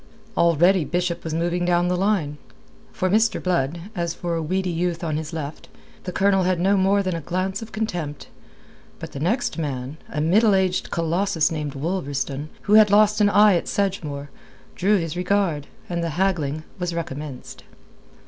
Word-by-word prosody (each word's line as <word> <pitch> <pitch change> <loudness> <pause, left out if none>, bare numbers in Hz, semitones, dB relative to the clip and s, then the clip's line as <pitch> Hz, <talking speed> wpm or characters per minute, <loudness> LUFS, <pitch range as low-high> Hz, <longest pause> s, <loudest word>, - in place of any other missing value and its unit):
Already 170 +2 +4
Bishop 175 +1 -2
was 160 - -4
moving 170 +2 0
down 175 0 +2
the 180 - +1
line. 180 -7 0 0.5
For 185 - -1
Mr. 220 +4 +3
Blood, 170 -3 -1
as 170 -2 -2
for 175 -1 -3
a 165 - -1
weedy 185 +3 -1
youth 170 0 -2
on 155 -2 -1
his 155 +1 -4
left, 155 -2 -6 0.4
the 180 - -3
Colonel 195 +1 +3
had 185 -1 +1
no 195 +3 +3
more 195 +1 +3
than 185 -2 -1
a 165 - -4
glance 185 +5 -2
of 225 - -9
contempt. 175 -10 -4 0.7
But - - -8
the 140 - -7
next 185 - 0
man, 135 -1 -4
a 150 - -3
middle 200 +7 +4
aged 185 -1 0
Colossus 170 0 +1
named 150 -3 -4
Wolverstone, 145 -3 -3 0.2
who 205 - +1
had 215 -1 +8
lost 210 +1 +4
an 205 - +5
eye 205 -1 +6
at 170 - -1
Sedgemoor, 150 -8 -2 0.4
drew 205 +3 +3
his 165 -2 -3
regard, 180 -5 0 0.2
and 170 -1 -2
the 165 - -1
haggling 155 -6 0 0.2
was 175 -1 -2
recommenced. 150 -4 -6
175 Hz, 175 wpm, -23 LUFS, 155-190 Hz, 0.7 s, had